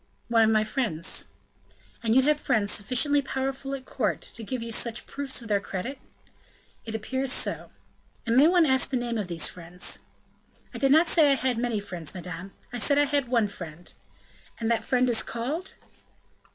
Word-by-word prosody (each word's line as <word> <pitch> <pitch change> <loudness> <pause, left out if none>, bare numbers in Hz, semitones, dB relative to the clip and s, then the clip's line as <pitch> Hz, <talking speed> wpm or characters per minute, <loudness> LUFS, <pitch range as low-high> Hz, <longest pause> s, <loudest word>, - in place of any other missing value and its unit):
"One 230 -1 +5
of - - +3
my 215 -1 +3
friends." 215 -7 -1 0.7
"And 230 -1 +1
you 265 - +6
have 300 +2 +3
friends 205 -7 +1
sufficiently 265 +8 +2
powerful 270 0 -3
at 260 -1 -9
court 225 -5 -1
to 230 - -8
give 245 +2 -4
you 230 - -6
such 230 +1 -1
proofs 275 -3 -2
of - - -9
their 205 -2 +2
credit?" 200 +7 -5 0.9
"It 220 -1 -5
appears 260 +4 -2
so." - - 0 0.6
"And 230 0 +1
may 280 +4 +7
one 350 -1 +5
ask 265 -2 +3
the 265 - 0
name 240 -2 -2
of 200 - -3
these 170 -3 0
friends?" 175 +1 -4 0.7
"I - - -6
did 270 -1 +3
not 320 +4 +6
say 310 -4 +5
I - - +5
had 255 -3 0
many 235 -3 0
friends, 175 -5 -5
madame, 180 +1 -7 0.2
I 245 - -3
said 280 +7 +2
I 290 - +5
had 285 -2 0
one 235 -3 +2
friend." 175 -3 -9 0.7
"And 230 0 0
that 225 -1 +1
friend 255 +1 +2
is 235 -2 +3
called?" 290 +11 -4
235 Hz, 190 wpm, -27 LUFS, 210-270 Hz, 0.9 s, may